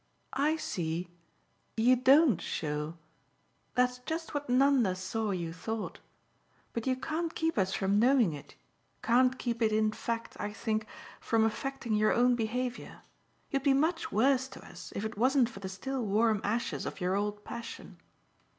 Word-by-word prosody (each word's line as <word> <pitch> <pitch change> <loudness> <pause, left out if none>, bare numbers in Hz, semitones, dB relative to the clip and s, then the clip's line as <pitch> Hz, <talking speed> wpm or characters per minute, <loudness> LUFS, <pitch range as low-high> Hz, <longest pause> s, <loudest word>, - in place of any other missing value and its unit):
"I 290 +4 +2
see 175 - -3 0.7
you 245 +3 +5
DON'T 260 - +5
show. 150 +1 -3 0.8
That's 250 0 +2
just 320 +6 -4
what 290 -2 -3
Nanda 255 -6 +4
saw 200 +4 -2
you 170 -4 -2
thought! 220 +4 -5 0.7
But 230 +2 -3
you 260 - +2
can't 320 +5 -3
keep 325 0 0
us 190 -2 +1
from 195 +2 +2
knowing 240 - +4
it 145 - -10 0.5
can't 255 +2 +4
keep 235 -2 -3
it 220 -1 +3
in 215 0 +2
fact, 230 +1 -4
I 210 0 -3
think, 215 0 -2 0.3
from 225 -1 +2
affecting 245 +1 -2
your 215 0 +3
own 245 +1 +4
behaviour. 245 +2 -3 0.5
You'd 275 - +1
be 275 0 +4
much 320 +4 0
worse 260 +4 +3
to - - -12
us - - -10
if 200 - -2
it 220 -1 -5
wasn't 255 0 +4
for 195 - -10
the 190 -1 -5
still 255 +7 -3
warm 215 0 +2
ashes 225 +4 -1
of - - -6
your 185 +1 0
old 205 +1 -2
passion." 235 - -8
230 Hz, 160 wpm, -31 LUFS, 205-260 Hz, 0.8 s, you